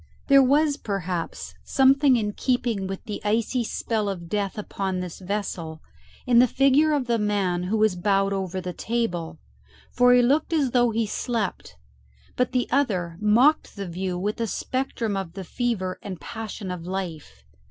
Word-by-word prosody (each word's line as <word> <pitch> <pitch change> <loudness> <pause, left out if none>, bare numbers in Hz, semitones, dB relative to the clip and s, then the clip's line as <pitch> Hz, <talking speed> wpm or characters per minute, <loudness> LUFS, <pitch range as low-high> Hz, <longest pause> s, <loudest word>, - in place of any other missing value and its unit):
There 275 0 +8
was 285 +2 +3
perhaps 185 - -4
something 270 0 +4
in 210 -3 -1
keeping 235 -6 -1
with 195 0 -6
the 210 -4 -6
icy 230 +4 0
spell 220 -2 -2
of 170 -4 -6
death 200 0 -2
upon 195 -2 -3
this 180 -2 -6
vessel 180 -5 -4 0.5
in 240 -2 +5
the 250 - +6
figure 275 +5 +3
of 285 -4 +1
the 235 -1 +1
man 195 -4 0
who 210 +4 0
was 215 -3 +3
bowed 195 +2 +1
over 190 -1 -3
the 180 -1 -5
table, 220 -9 -2 0.5
for 245 0 +4
he 245 - +5
looked 290 +7 +2
as 285 -6 +2
though 245 -1 +3
he 225 0 0
slept; 220 -2 -3 0.6
but 250 0 0
the 250 -1 0
other 185 -12 0
mocked 240 +9 +3
the 200 -2 -5
view 180 +1 -3
with 210 +5 -2
a 230 - 0
spectrum 235 -2 -2
of 190 -4 -4
the 190 +1 -6
fever 190 -3 -2
and 190 -4 -7
passion 215 +2 -6
of 175 -1 -6
life. 165 - -6
210 Hz, 170 wpm, -25 LUFS, 185-245 Hz, 0.6 s, There